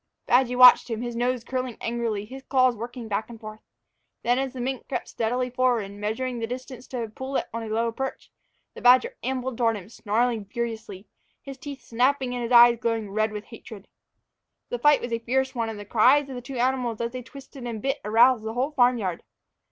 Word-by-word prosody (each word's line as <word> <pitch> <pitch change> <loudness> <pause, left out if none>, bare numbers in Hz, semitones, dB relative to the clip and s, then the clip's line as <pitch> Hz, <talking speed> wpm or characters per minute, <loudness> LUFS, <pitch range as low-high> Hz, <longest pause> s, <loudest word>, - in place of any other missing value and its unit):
Badgy 250 0 +3
watched 250 0 +8
him, 225 0 -3
his 240 -1 -4
nose 245 0 -1
curling 255 -1 -4
angrily, 230 -3 -2
his 265 +5 -10
claws 255 -2 +2
working 235 +1 -7
back 210 +2 -2
and 230 -1 -10
forth. 215 0 -9 0.6
Then, 245 +2 +2
as 270 -1 -2
the 260 - -7
mink 260 +1 -3
crept - - -3
stealthily 250 +2 -1
forward, 245 -5 +1
measuring 220 +5 -3
the 225 - -3
distance 255 0 -8
to 250 -3 -4
a - - -4
pullet 260 +5 -4
on 230 - -3
a 225 - -6
lower 230 +2 0
perch, 265 +3 -6 0.4
the - - -11
badger 255 - +5
ambled 260 -1 -3
toward 230 -2 +2
him, 195 0 -11
snarling 230 0 -1
furiously, 220 -2 -5 0.4
his 275 -1 -9
teeth 285 -1 -8
snapping 255 +2 +1
and 245 - -3
his 235 +1 -4
eyes 240 -1 +7
glowing 225 -4 -2
red 215 +1 0
with 210 -1 -6
hatred. 220 -3 -12 0.8
The - - -3
fight 295 -2 +5
was 240 -1 -4
a 230 - 0
fierce 260 +3 -1
one, 230 -3 -2
and 220 -2 -6
the 205 - -8
cries 255 +7 +4
of - - -6
the 250 - -6
two 260 +1 -7
animals 245 -2 0
as 235 0 -2
they 255 0 -6
twisted 265 0 -11
and 230 -2 -4
bit 270 +5 -2
aroused 230 +3 +4
the 220 0 -4
whole 260 +5 -1
barn 250 -3 +3
yard. 185 -6 -3
240 Hz, 215 wpm, -25 LUFS, 225-255 Hz, 0.8 s, watched